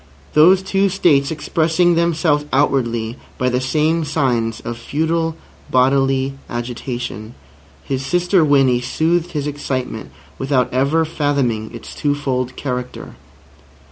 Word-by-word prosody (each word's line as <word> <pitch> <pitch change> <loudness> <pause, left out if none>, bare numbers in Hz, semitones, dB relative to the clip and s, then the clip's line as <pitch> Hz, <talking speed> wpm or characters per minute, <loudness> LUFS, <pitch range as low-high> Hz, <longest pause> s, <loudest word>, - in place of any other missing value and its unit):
Those 180 +5 +6
two 195 +1 +1
states 150 -7 +3
expressing 165 +2 +1
themselves 165 -3 +1
outwardly 120 -4 0 0.2
by 125 - +1
the 125 0 0
same 155 +5 +1
signs 125 -7 0
of 120 - -5
futile 160 +4 -1 0.3
bodily 135 +1 +2 0.2
agitation, 120 -2 -5 0.5
his 135 -1 -3
sister 180 +3 +2
Winnie 135 -4 +3
soothed 165 +7 0
his 145 -2 -2
excitement 130 - -4 0.3
without 130 -2 0
ever 140 +5 +2
fathoming 140 -8 -1
its 115 -1 -9
twofold 135 -3 -1
character. 125 -2 -5
140 Hz, 110 wpm, -19 LUFS, 125-160 Hz, 0.5 s, Those